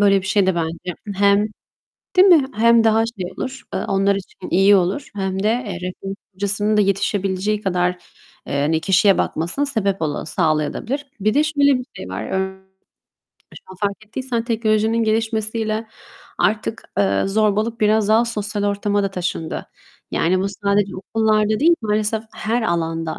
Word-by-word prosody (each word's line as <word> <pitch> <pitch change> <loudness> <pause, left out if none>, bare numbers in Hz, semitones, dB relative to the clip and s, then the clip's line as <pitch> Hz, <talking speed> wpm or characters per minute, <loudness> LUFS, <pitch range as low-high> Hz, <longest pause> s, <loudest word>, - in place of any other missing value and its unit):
Böyle 200 -1 +4
bir 190 - -8
şey 195 0 +2
de 190 - +2
bence 170 +1 -3 0.2
hem 200 +2 +3 0.7
değil 375 +2 +7
mi? 310 -7 +6
Hem 230 +1 +5
daha 225 0 +4
şey 195 -6 -6
olur, 265 0 -5
eee, - - -2
onlar 195 0 +2
için 190 -1 -8
iyi 195 +3 +5
olur 195 +8 0
hem 190 0 -2
de, - - +2
eee, 230 -4 -1
rehberlik 195 +2 -6 0.2
hocasının 205 +2 0
da - - +5
yetişebileceği 195 +1 0
kadar, 180 -2 +1 0.6
eee, 140 0 -1
hani, 160 +2 +1
kişiye 195 +1 +4
bakmasını 175 - -1
sebep 200 -9 -1
ola 150 -2 -2
sağlayabilir 155 - 0
de. 285 - -12 0.2
Bir 215 +3 +1
de 295 - +3
şöyle 285 -3 +3
bir 250 - -7
şey 95 - -7
var. 95 +3 -4
Ör 190 0 -2 1.0
şu - - -12
an 190 - -11
fark 205 +1 -2
ettiysen 235 +1 -3
teknolojinin 225 0 +1
gelişmesiyle 220 0 -1 0.5
artık, 215 +1 0 0.2
eee, 100 -1 +2
zorbalık 215 +3 0
biraz 215 0 +3
daha 220 +2 +4
sosyal 210 -3 -2
ortama 205 0 0
da 195 - -1
taşındı. 175 -3 -4 0.4
Yani 185 +3 +1
bu 195 - 0
sadece 200 -1 0
okullarda 215 +2 +1
değil, 340 +3 +5
maalesef 215 +1 0
her 230 +3 -1
alanda 165 -4 -2
205 Hz, 165 wpm, -20 LUFS, 190-220 Hz, 1.0 s, değil